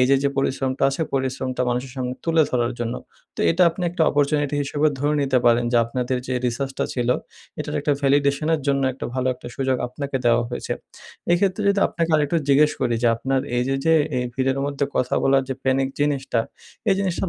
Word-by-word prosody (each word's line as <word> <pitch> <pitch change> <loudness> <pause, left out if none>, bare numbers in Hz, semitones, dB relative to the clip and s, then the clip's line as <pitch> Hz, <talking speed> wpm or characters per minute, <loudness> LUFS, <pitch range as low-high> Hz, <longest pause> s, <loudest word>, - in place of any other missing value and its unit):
এইযে, 135 +2 +4
যে - - +4
পরিশ্রমটা 135 0 -1
আছে 150 +4 -2
পরিশ্রমটা 130 -1 -1
মানুষের 125 +1 -2
সামনে 125 0 -3
তুলে 165 -1 +4
ধরার 120 -1 0
জন্য। 120 0 -2 0.4
তো - - -4
এটা 180 - +3
আপনি 180 +2 -7
একটা 170 -2 0
অপরচুনিটি 145 0 +1
হিসেবে 145 +2 0
ধরে 145 +2 +1
নিতে 135 -2 +2
পারেন। 120 0 +4
যে 120 - +4
আপনাদের 125 +2 -2
যে 130 - -2
রিসার্চ 135 +3 -2
টা - - +1
ছিল 125 -1 -1 0.5
এটার - - -4
একটা 145 - +1
ভ্যালিডেশন 140 +2 +2
এর 155 - -2
জন্য 140 -1 +2
একটা 130 - -6
ভালো 130 0 -1
একটা 125 - -13
সুযোগ 130 -1 +1
আপনাকে 140 +2 -4
দেওয়া 120 0 +4
হয়েছে। 120 - -4 0.6
এক্ষেত্রে 190 +3 +1
যদি 200 0 +2
আপনাকে 165 -1 -2
আরেকটু 150 +2 +1
জিজ্ঞেস 150 +2 +5
করি 120 -2 +1
যে 120 - +4
আপনার 135 +2 0 0.2
এইযে, 130 +2 0
যে 165 - +5 0.2
এ - - +2 0.2
ভিড়ের 135 0 0
মধ্যে 140 0 -1
কথা 125 0 +1
বলার 135 0 +4
যে 135 - -2
প্যানিক 135 0 +2
জিনিসটা 135 -5 0 0.5
এই 195 - +5
জিনিসটার 190 -1 -1
135 Hz, 200 wpm, -22 LUFS, 125-145 Hz, 0.6 s, জিজ্ঞেস